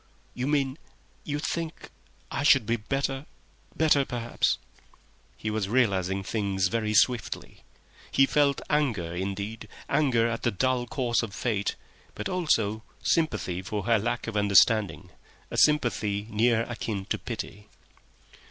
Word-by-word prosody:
"You 125 +2 -3
mean—you 145 +1 -3
think—I 160 -4 -6
should 145 -5 +5
be 115 +2 +1
better, 135 +5 -2 0.5
better 150 -3 +4
perhaps—" 120 -3 0 0.8
He 110 - -3
was 105 -2 -1
realising 100 -5 +1
things 95 -2 0
very 110 0 -1
swiftly. 120 +2 +1 0.5
He 135 - +5
felt 140 0 +2
anger 120 - 0
perhaps, 100 +4 -4 0.2
anger 130 -6 +2
at 115 0 -3
the - - +2
dull 125 +3 0
course 120 -2 0
of 110 -4 -6
fate, 105 -5 -1 0.4
but - - -3
also 115 - +1 0.2
sympathy 105 - 0
for 105 +1 -4
her 115 +1 +3
lack 120 +3 -2
of 115 - -5
understanding—a 105 +1 +1
sympathy 110 -9 +2
near 115 +1 +3
akin 110 -5 -4
to - - -2
pity. 105 -3 -6
115 Hz, 125 wpm, -27 LUFS, 105-135 Hz, 0.8 s, should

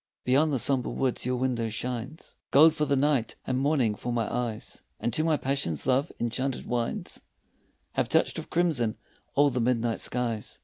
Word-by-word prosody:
Beyond 145 +5 +3
the 135 - +1
sombre 130 +1 +1
woods 130 -2 -1
your 125 - +1
window 125 -3 0
shines 125 +6 -5
Gold 155 +3 +7
for 155 -1 0
the 140 - +2
night 140 -3 +1
and 130 0 0
morning 135 -6 +2
for 120 +4 -5
my 115 -2 0
eyes, 120 -3 -4 0.2
And 120 - -2
to 155 - +1
my 160 -2 +2
passion 135 - -1
love's 135 +4 +2
enchanted 125 +3 -2
wines 120 -1 -3 0.7
Have - - -1
touched - - +2
with - - -9
crimson 150 -11 +1 0.4
all 145 0 +5
the 125 -1 -1
midnight 115 -1 +1
skies. 120 -3 -2
125 Hz, 175 wpm, -28 LUFS, 120-140 Hz, 0.7 s, Gold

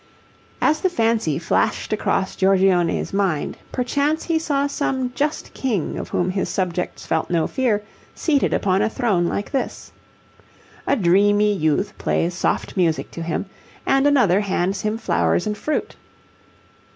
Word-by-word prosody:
As 310 0 +3
the 375 - +2
fancy 225 - +1
flashed 165 +5 0
across 195 -3 0
Giorgione's 190 -3 +2
mind, 195 -7 0 0.2
perchance 285 +5 0
he 330 -2 +1
saw 285 -3 0
some 265 -3 -2
just 295 +3 -2
king 225 - -2
of - - -6
whom 180 +1 0
his 190 0 -2
subjects 180 -2 -2
felt - - -1
no 165 -2 +1
fear 225 -6 0 0.3
seated 290 -4 +1
upon 190 0 +1
a 215 - +2
throne 210 -8 +1
like 200 - -3
this. 270 - -3 1.0
A 280 - +3
dreamy 205 +1 +3
youth 190 +4 0
plays 170 +2 0
soft 180 - -1
music 170 -4 0
to 170 - -7
him, 165 +3 -2 0.4
and 270 +1 +3
another 230 -10 +4
hands 195 -1 -1
him 215 +1 -1
flowers 85 - +1
and 210 0 -1
fruit. 305 +8 -3
205 Hz, 145 wpm, -21 LUFS, 180-260 Hz, 1.0 s, another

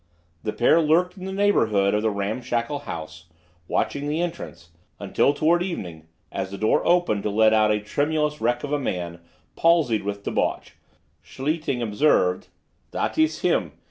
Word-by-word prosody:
The 105 - -2
pair 155 +9 +3
lurked 170 +4 +2
in 185 -1 -9
the 190 - -4
neighborhood 115 - +2
of 105 - +1
the 110 - +1
ramshackle 115 +6 -2
house 80 +1 -7 0.4
watching 145 +1 -1
the 150 +2 -1
entrance, 85 - -5 0.3
until - - +2
toward 165 +4 +2
evening, 90 - -5 0.2
as 95 -1 -3
the 100 - -7
door 110 - +2
opened 175 - +2
to 105 - -2
let 110 +1 +4
out 110 -1 +4
a 105 0 +2
tremulous 150 +7 -1
wreck 120 +1 0
of 145 0 -3
a 145 - +1
man, 85 -9 -4 0.4
palsied 160 -10 +3
with 100 0 -5
debauch, - - -2 0.5
Schlichting 140 -3 -2
observed: 105 -5 +2 0.4
"That - - -2
iss 315 0 +2
him. - - +1
120 Hz, 160 wpm, -24 LUFS, 100-155 Hz, 0.5 s, let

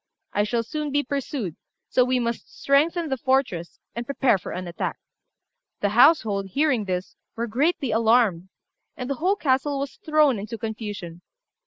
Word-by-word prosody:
I 205 - +2
shall 230 +2 0
soon 300 +5 -4
be 290 +1 +2
pursued; 265 - -3 0.3
so 250 - +3
we 255 +1 +1
must 235 -1 -4
strengthen 315 +4 +2
the 265 - -1
fortress, 250 -11 0 0.2
and 235 - -3
prepare 255 -4 +2
for - - -7
an 180 0 -5
attack." 170 - -3 0.8
The 205 - +2
household, 220 -5 +4
hearing 265 0 +1
this, 185 -1 -3 0.2
were 230 - -1
greatly 270 +3 0
alarmed, 220 -5 +3 0.5
and 250 - -4
the 275 - 0
whole 380 +4 +3
castle 280 -4 +1
was 275 0 -4
thrown 305 -7 +3
into 220 +3 -6
confusion. 210 -6 -6
245 Hz, 160 wpm, -24 LUFS, 205-280 Hz, 0.8 s, household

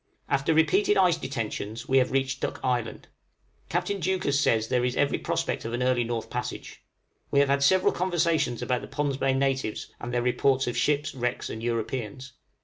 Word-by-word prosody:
After 140 +2 +1
repeated 185 +7 +3
ice 180 -3 +5
detentions, 115 -5 -5
we 135 0 +4
have 125 - +2
reached 135 0 0
Duck - - -3
Island. 125 -3 -2 0.6
Captain 200 -1 -1
Deuchars 170 -5 +1
says 110 -6 +2
there 125 0 +1
is 125 0 0
every 145 - +1
prospect - - -2
of 115 - -5
an 120 +1 -1
early 125 -1 +2
north 115 -1 -3
passage; - - -6 0.5
we 140 - +3
have 140 -1 +3
had 140 0 +2
several 185 +7 +4
conversations 170 -8 0
about 125 -1 0
the - - -8
Pond's 145 -2 -2
Bay 135 -1 +1
natives, 135 -4 -1
and 120 - -5
their 120 0 0
reports 130 +2 +2
of 120 - -3
ships, 145 +4 +1
wrecks, 125 -1 -2
and 110 - -6
Europeans. 120 +2 -3
135 Hz, 185 wpm, -27 LUFS, 120-145 Hz, 0.6 s, ice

